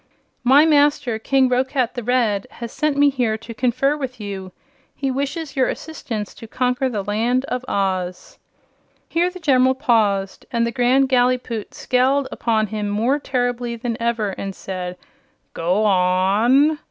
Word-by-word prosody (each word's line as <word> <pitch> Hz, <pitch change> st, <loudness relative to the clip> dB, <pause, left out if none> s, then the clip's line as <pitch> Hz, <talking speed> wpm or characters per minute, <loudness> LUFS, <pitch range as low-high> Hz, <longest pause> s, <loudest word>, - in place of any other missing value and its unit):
"My 275 Hz, +5 st, +6 dB
master, 290 Hz, -6 st, +2 dB
King 265 Hz, +3 st, +2 dB
Roquat 255 Hz, 0 st, 0 dB
the 245 Hz, -, -4 dB
Red, 225 Hz, -4 st, 0 dB
has 235 Hz, -1 st, -7 dB
sent 305 Hz, -2 st, -1 dB
me 285 Hz, 0 st, +5 dB
here 240 Hz, -5 st, 0 dB
to 230 Hz, +1 st, -10 dB
confer 255 Hz, +4 st, +1 dB
with 260 Hz, -4 st, -6 dB
you. 195 Hz, -3 st, -6 dB, 0.4 s
He 275 Hz, -1 st, -2 dB
wishes 280 Hz, +3 st, -3 dB
your 260 Hz, -2 st, +2 dB
assistance 225 Hz, -10 st, -5 dB
to 225 Hz, -, -11 dB
conquer 250 Hz, +2 st, 0 dB
the 210 Hz, -5 st, -3 dB
Land 235 Hz, +6 st, 0 dB
of 250 Hz, -2 st, -3 dB
Oz." 185 Hz, -2 st, -2 dB, 0.7 s
Here 345 Hz, +2 st, +1 dB
the 365 Hz, 0 st, -10 dB
General 260 Hz, -5 st, +3 dB
paused, 215 Hz, -8 st, 0 dB
and 235 Hz, -1 st, +1 dB
the 235 Hz, -, -2 dB
Grand 255 Hz, +2 st, +3 dB
Gallipoot 245 Hz, -3 st, 0 dB
scowled 260 Hz, +2 st, +1 dB
upon 220 Hz, -2 st, 0 dB
him 210 Hz, -1 st, -2 dB
more 235 Hz, +8 st, +1 dB
terribly 245 Hz, -3 st, -2 dB
than 235 Hz, 0 st, -3 dB
ever 230 Hz, -3 st, 0 dB
and 195 Hz, 0 st, -6 dB
said: 180 Hz, -1 st, -6 dB, 0.6 s
"Go 180 Hz, +6 st, 0 dB
on!" 205 Hz, +10 st, +3 dB
245 Hz, 155 wpm, -21 LUFS, 215-270 Hz, 0.7 s, My